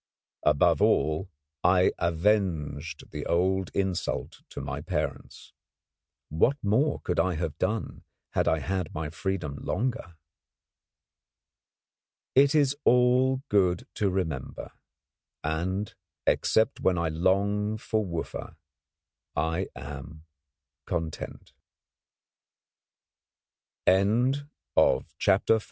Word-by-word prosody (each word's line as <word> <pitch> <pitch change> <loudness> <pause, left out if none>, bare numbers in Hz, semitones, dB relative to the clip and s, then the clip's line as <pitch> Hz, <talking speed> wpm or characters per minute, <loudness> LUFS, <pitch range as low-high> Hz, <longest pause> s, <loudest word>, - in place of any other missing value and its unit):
Above 75 -1 +4
all, 80 +6 +2 0.3
I 90 0 +5
avenged 85 -5 0
the 75 +1 -5
old 95 +1 +1
insult 95 -3 -2
to - - -7
my - - -4
parents. - - -4 0.8
What 115 - +2
more 130 +9 +2
could - - 0
I 95 -2 +2
have 80 -1 -3
done 110 -7 -2 0.3
had - - +1
I 80 - +3
had 90 +2 -3
my 75 0 -3
freedom 85 -4 -3
longer? 115 -5 -2 2.2
It 140 +3 +5
is 145 -2 +3
all 125 +2 +4
good 90 -4 +2
to 100 - +1
remember, 80 -8 -3 0.7
and, 90 +6 -2 0.3
except 110 0 +2
when 90 -2 +2
I 85 -1 0
long 100 +6 +1
for 110 0 -1
Wooffa, 85 -3 -5 0.8
I 80 +4 0
am 75 +3 -8 0.6
content. 80 -3 -4 2.3
THE - - +7
END 120 +9 +2 0.3
BILLING - - +6
AND - - -6
SONS, 100 +1 +3
LTD. 115 - +5
95 Hz, 105 wpm, -28 LUFS, 80-105 Hz, 2.3 s, THE